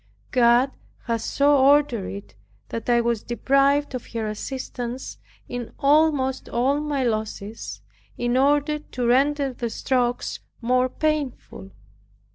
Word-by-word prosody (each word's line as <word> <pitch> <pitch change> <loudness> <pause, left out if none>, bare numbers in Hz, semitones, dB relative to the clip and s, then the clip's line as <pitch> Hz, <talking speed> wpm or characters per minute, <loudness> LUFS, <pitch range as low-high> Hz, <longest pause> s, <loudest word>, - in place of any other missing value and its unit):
God 245 +1 +4 0.3
has 230 -2 -2
so 285 +1 +3
ordered 275 -6 +4
it 200 0 -8 0.3
that 230 +1 -5
I 240 0 +4
was 235 -2 0
deprived 275 +4 +2
of 255 - -5
her 225 -1 -2
assistance 245 +3 -5 0.3
in 245 -2 -6
almost 285 -2 +2
all 265 +5 +1
my 295 -3 -1
losses, 215 -2 -4 0.4
in 240 0 0
order 290 +3 +2
to 250 -4 -5
render 275 +2 +2
the 235 -1 -3
strokes 245 +1 -1 0.2
more 250 +2 +2
painful. 290 - -3
255 Hz, 120 wpm, -24 LUFS, 235-280 Hz, 0.4 s, God